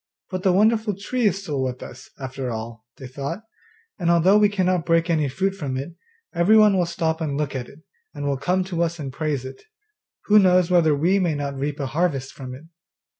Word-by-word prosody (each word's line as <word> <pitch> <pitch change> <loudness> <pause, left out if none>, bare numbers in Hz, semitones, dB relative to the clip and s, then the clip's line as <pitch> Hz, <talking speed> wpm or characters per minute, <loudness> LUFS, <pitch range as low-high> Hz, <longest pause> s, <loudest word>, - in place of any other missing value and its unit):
'But 185 -1 -3
the 185 - +3
wonderful 215 +2 +2
tree 230 +4 -1
is 195 0 -1
still 145 -7 -3
with 130 -1 -3
us, 125 - -11
after 130 -1 -5
all,' 115 0 -7
they 135 - -9
thought, 140 - -5 0.6
'and 170 -2 0
although 175 +5 +5
we 210 -1 +5
cannot 185 -3 0
break 165 0 +2
any 155 -4 +1
fruit 190 +8 -1
from 140 -9 -4
it, 140 +6 -6 0.4
everyone 210 +4 +5
will 180 -2 +1
stop 165 -1 -2
and 145 -3 -2
look 145 -2 -2
at 125 -2 -5
it, 155 +3 -17 0.3
and 145 -1 -6
will 140 -1 0
come 180 +7 0
to 180 -2 -3
us 170 0 0
and 140 -4 -6
praise 145 -3 -2
it; 130 - -9 0.6
who 210 0 +6
knows 185 -2 +4
whether 160 -4 +4
we 175 +7 +2
may 175 -5 0
not 140 -1 -3
reap 140 +2 -3
a 140 - -2
harvest 140 -2 -1
from 130 -1 -8
it? 135 - -13
165 Hz, 215 wpm, -23 LUFS, 140-185 Hz, 0.6 s, who